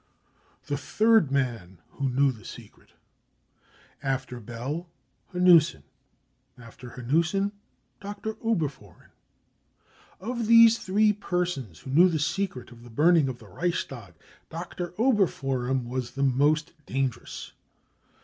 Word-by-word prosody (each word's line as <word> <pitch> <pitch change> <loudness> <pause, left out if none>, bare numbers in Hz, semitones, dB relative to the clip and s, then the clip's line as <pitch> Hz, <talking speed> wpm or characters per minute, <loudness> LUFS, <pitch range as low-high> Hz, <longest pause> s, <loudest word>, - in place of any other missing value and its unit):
The 145 -1 -2
Third 220 -4 +3
Man 115 -10 -2
who 135 -1 -2
Knew 135 +2 +3
the 110 -4 -13
Secret. - - -13 1.1
After 130 -2 -3
Bell, 125 - -5 0.4
Hanussen. 175 - +5 0.8
Alter 120 +1 -12
Hanussen, 170 +10 +1 0.5
Dr. 205 +2 -5
Oberfohren. 150 - -3 1.1
Of 235 +3 -3
these 230 0 +7
three 210 +3 +2
persons 175 - -3
who 130 - -8
knew 175 +6 +6
the 165 - 0
secret 155 -4 -2
of 120 -1 -14
the 120 - -13
burning 155 +4 +4
of 125 - -5
the 110 - -15
Reichstag, 125 - -4 0.3
Dr. 175 +1 -6
Oberfohren 135 - +1
was 125 0 -3
the 140 - -3
most 145 +4 +2
dangerous. 135 -3 -3
145 Hz, 110 wpm, -27 LUFS, 125-185 Hz, 1.1 s, these